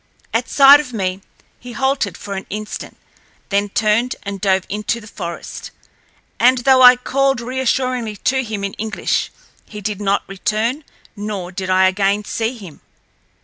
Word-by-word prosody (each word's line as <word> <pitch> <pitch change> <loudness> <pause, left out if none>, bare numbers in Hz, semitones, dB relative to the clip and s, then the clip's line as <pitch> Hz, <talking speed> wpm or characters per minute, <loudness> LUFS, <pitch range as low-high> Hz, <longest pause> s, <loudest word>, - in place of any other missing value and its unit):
At 230 +2 0
sight 280 +1 +8
of 265 -4 -6
me, 190 -3 -2 0.4
he 245 0 -10
halted 265 - -1
for 200 - -7
an 190 0 -6
instant, 210 +1 -6 0.5
then 200 0 0
turned 215 +5 +1
and 200 -1 -6
dove 190 -2 +2
into 210 +3 -2
the 220 - -13
forest, 170 -5 -7 0.7
and, 255 +2 +5
though 260 +1 +4
I 250 0 +10
called 270 +1 0
reassuringly 255 -2 -1
to 265 +5 +1
him 215 -4 -5
in 195 - -3
English 220 -1 -1 0.4
he 210 - -9
did 210 0 -4
not 200 0 +1
return 215 +8 -2 0.3
nor 205 -4 -5
did 190 0 -5
I 185 0 +4
again 200 +2 +1
see 225 +4 -3
him. 185 -9 -12
215 Hz, 155 wpm, -19 LUFS, 195-250 Hz, 0.7 s, I